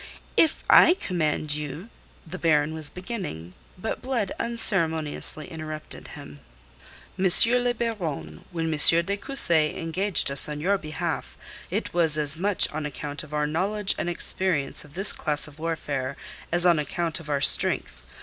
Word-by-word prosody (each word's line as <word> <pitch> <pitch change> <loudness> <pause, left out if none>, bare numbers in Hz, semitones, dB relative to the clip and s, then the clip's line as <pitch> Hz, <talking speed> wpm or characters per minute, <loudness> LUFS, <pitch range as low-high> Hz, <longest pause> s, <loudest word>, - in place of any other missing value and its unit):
"If 320 - +2
I 350 - +7
command 155 - -1
you..." 150 +7 -5 0.4
the 180 +3 -8
Baron 155 -2 +2
was 155 -2 -4
beginning. 180 - -7 0.2
But 220 +5 -4
Blood 250 -6 -2
unceremoniously 160 -10 0
interrupted 155 -1 -8
him. 75 -1 -11 0.8
"M. 190 - +1 0.4
le 245 0 +1
Baron, 165 - -4
when 165 -2 -2
M. 165 +3 +7
de 200 - -1
Cussy 170 - +1
engaged 175 0 0
us 140 +2 +2
on 150 0 -5
your 195 +5 +1
behalf, 155 -1 -5 0.3
it - - -3
was 165 -3 +2
as 150 +1 +1
much 200 +1 +3
on 150 0 -4
account 145 0 -6
of 150 - -13
our 150 0 0
knowledge 195 +6 0
and 175 - -2
experience 175 -4 0
of 150 -1 -16
this 195 +3 +5
class 150 -1 -2
of 150 0 -16
warfare 145 -5 -3 0.3
as 175 +1 +2
on 170 -3 +4
account 165 +3 -2
of 160 -2 -12
our 145 -1 0
strength. 60 - +2
160 Hz, 155 wpm, -25 LUFS, 150-185 Hz, 0.8 s, I